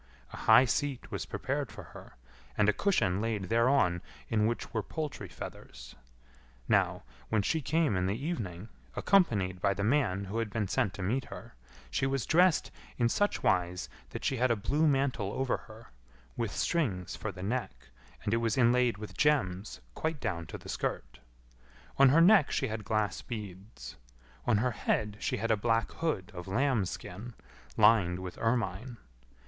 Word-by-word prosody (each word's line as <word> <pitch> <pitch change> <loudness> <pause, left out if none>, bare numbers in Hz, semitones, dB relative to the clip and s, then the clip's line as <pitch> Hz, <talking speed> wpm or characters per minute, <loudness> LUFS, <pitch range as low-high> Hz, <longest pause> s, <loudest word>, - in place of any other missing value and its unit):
A - - -6
high 125 +4 +6
seat 135 +1 -2
was - - -4
prepared - - -3
for - - -9
her, - - -12 0.4
and 105 - +4
a 105 - +4
cushion 100 - +1
laid 110 -4 -2
thereon 115 -7 +3 0.3
in 110 -1 +2
which 120 - -3
were 110 - 0
poultry 150 - -5
feathers. - - -9 0.7
Now, - - +2 0.3
when 110 -2 +2
she 160 +10 0
came 155 - +1
in 90 0 +1
the 100 +3 -1
evening, 110 - -4 0.3
accompanied 100 - +2
by 100 0 +2
the 100 - -2
man 105 -5 +1
who 105 +4 -3
had 115 -2 -1
been 105 -1 -2
sent 95 -1 0
to 100 - -5
meet 120 +8 0
her, - - -10 0.4
she 130 - +1
was 135 -2 -1
dressed 175 0 +3 0.3
in 120 -2 +2
such 205 +11 0
wise 90 0 +1 0.2
that - - -6
she 135 - +1
had 125 +2 +2
a 115 - +3
blue 145 +9 +1
mantle 135 -8 +1
over 130 -1 0
her, 110 +1 -15 0.4
with 115 -2 -1
strings 100 - -1
for 110 - -4
the 90 -1 -9
neck, 120 - -4 0.3
and 105 - 0
it - - +3
was 115 +2 0
inlaid 125 -2 +3
with 105 0 -8
gems 95 - +1
quite 160 - -2
down 85 -9 -3
to - - -7
the - - -13
skirt. - - -4 0.8
On 135 -1 +8
her 160 +5 +5
neck 185 -3 +6
she 130 - -1
had 110 0 -4
glass 110 0 -1
beads. 100 - -8 0.5
On 115 -3 +4
her 125 +4 +1
head 105 -1 -1
she 130 - -1
had 115 +2 -1
a - - +5
black 115 +2 0
hood 150 - -2
of 90 0 -8
lambskin, 110 -2 -2 0.4
lined 90 -6 +5
with 90 -1 -7
ermine. 115 +1 -1
115 Hz, 175 wpm, -31 LUFS, 95-130 Hz, 0.8 s, On